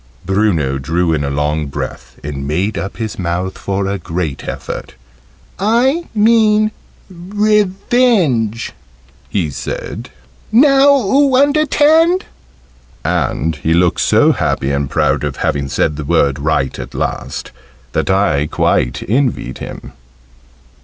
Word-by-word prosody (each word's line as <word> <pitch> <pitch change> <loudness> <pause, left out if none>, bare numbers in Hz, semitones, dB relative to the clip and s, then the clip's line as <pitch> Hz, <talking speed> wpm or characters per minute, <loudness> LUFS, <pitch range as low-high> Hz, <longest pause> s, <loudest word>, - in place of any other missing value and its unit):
Bruno 85 -9 +1
drew 80 +5 0
in 75 -2 -1
a 70 - -1
long 75 +2 -1
breath, 70 - -7
and 70 -1 -5
made 95 +8 -1
up 95 - -5
his 110 -3 -5
mouth 90 +1 -2
for 100 0 -2
a 100 0 -2
great 85 -4 -4
effort. - - -6 0.6
"I 250 - +2
mean 215 -1 +4 0.4
revenge," 195 - +1 0.6
he 85 -7 -1
said: 65 - -6 0.4
"now 275 +3 +5
oo 275 +1 +3
under'tand." 305 +5 +3 0.8
And 80 +2 -1
he 80 +2 0
looked 90 0 +2
so - - +4
happy 65 - -1
and 70 -1 -1
proud - - +1
at - - -2
having 70 -1 -1
said 75 +2 0
the 75 - -4
word 70 -2 +1
right 70 -2 -1
at - - -8
last, - - -4 0.4
that - - -1
I 95 -7 +2
quite - - 0
envied 120 - -1
him. 65 - -8
100 Hz, 125 wpm, -16 LUFS, -, 0.8 s, now